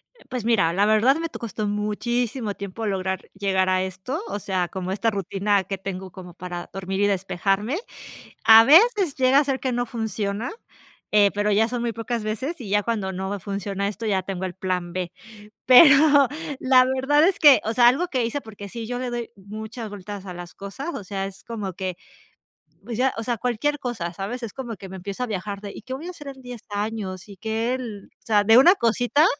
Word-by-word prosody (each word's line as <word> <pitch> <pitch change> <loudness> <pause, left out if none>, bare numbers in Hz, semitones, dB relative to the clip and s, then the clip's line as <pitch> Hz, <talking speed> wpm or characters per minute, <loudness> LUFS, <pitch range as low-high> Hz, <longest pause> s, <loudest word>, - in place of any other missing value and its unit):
Eh, 485 - -22
pues 245 -4 -4
mira, 195 -8 +3
la 200 +3 +3
verdad 215 +5 +4
me 330 0 -3
to - - -9
costó 215 -2 -4
muchísimo 215 +2 -1
tiempo 200 +3 -6
lograr 190 -2 -2
llegar 190 -1 +1
a 185 0 +2
esto, 190 - -4
o 205 - -4
sea, 185 -2 -1
como 185 +1 -5
esta 210 +4 +1
rutina 200 0 0
que 195 +1 -4
tengo 190 -1 -6
como 180 -1 -11
para 175 -1 -7
dormir 195 +1 -3
y 205 - +4
despejarme. 195 - 0 0.7
A 225 0 +10
veces 375 - +5
llega 260 +1 +4
a - - +3
ser 270 -2 -1
que 260 - -1
no 245 0 -1
funciona, 220 - -3 0.6
eh, 205 -1 +5
pero 205 +1 0
ya 215 +2 +3
son 240 0 -3
muy 235 -1 -1
pocas 230 0 -3
veces 260 +10 -3
y 215 - -7
ya 205 +1 +2
cuando 210 -4 -2
no 190 +1 -4
me 205 0 -3
funciona 200 +1 -3
esto, 210 +3 -5
ya 195 -3 +1
tengo 190 -1 -4
el 180 - -5
plan 180 -2 -3
B. 180 -1 -3 0.6
Pero 280 +1 +8 0.3
la 260 -1 +5
verdad 265 +4 +3
es 385 - -1
que, 290 -4 +8
o 220 - -1
sea, 240 0 +7
algo 285 +9 +1
que 255 -7 0
hice, 235 +5 -2
porque 210 -4 -10
sí, 230 +2 -6
yo 245 +1 -3
le 250 -1 -3
doy 240 -1 -4
mucha 215 +4 -7
vueltas 205 -1 -8
a 180 - -6
las 175 0 -9
cosas, 200 +10 -7
o 205 - -6
sea, 195 0 -3
es 195 -1 -11
como 210 -5 -5
que, 185 -1 -4 0.9
pues 235 -2 -5
ya, 265 +1 +2
o 225 - -3
sea, 240 0 -1
cualquier 250 +5 -1
cosa, 200 -10 -4
¿sabes?, 210 +8 -5
es 225 - -5
como 240 -4 -6
que 190 +1 -10
me 190 - -7
empiezo 200 +6 -5
a - - -2
viajar 200 -1 -4
de, 205 -1 -7
¿y - - -9
qué 260 - -6
voy 275 +5 -6
a - - -4
hacer 295 -5 -12
en 265 -1 -11
10 245 -3 -8
años? 205 -3 -4
¿Y 200 - -11
que 225 +4 -1
el, 225 -6 -7
o - - -38
sea, 210 -2 +3
de 225 +3 +6
una 335 +8 +8
cosita. 245 - +2
215 Hz, 220 wpm, -24 LUFS, 195-245 Hz, 0.9 s, A